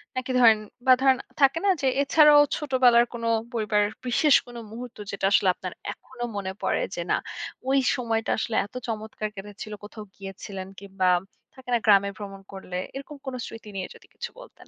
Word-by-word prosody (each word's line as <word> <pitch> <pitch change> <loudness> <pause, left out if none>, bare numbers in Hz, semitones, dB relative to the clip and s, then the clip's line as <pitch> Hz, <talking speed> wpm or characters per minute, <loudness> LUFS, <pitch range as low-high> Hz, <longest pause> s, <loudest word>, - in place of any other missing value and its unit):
নাকি 255 0 -2
ধরেন 225 -3 +7 0.3
বা, 260 - +8
ধরেন 265 -1 +5 0.2
থাকে 275 +4 +5
না - - +4
যে 270 - +2
এছাড়াও 295 +1 +7 0.2
ছোটবেলার 255 -5 +4
কোন 235 -1 -6 0.3
পরিবারের 210 -2 +1 0.2
বিশেষ 280 +3 +4
কোনো 240 -1 -8
মুহূর্ত 240 +2 -8
যেটা 200 - -2
আসলে 190 -2 +4
আপনার 185 -1 -6 0.2
এখনো 250 -2 -10
মনে 195 -2 -3
পড়ে - - 0
যে, - - -3
না, - - +4 0.5
ওই 275 +1 +4 0.2
সময়টা 225 -2 -1
আসলে 220 0 -2
এতো 205 - -9
চমৎকার 215 -1 -4
কেটেছিলো, 205 +2 -8
কোথাও 215 +1 -9
গিয়েছিলেন 195 -1 -7
কিংবা, 195 -1 -2 0.5
থাকে 260 -1 -13
না 235 - +4
গ্রামে 200 -2 +5
ভ্রমণ 195 -2 -8
করলে, 185 -2 -6 0.2
এরকম 275 +2 -7
কোনো 260 -1 -4
স্মৃতি 225 -1 -10
নিয়ে 190 -1 -3
যদি - - -18
কিছু - - -5
বলতেন। - - -15
225 Hz, 175 wpm, -26 LUFS, 200-260 Hz, 0.5 s, বা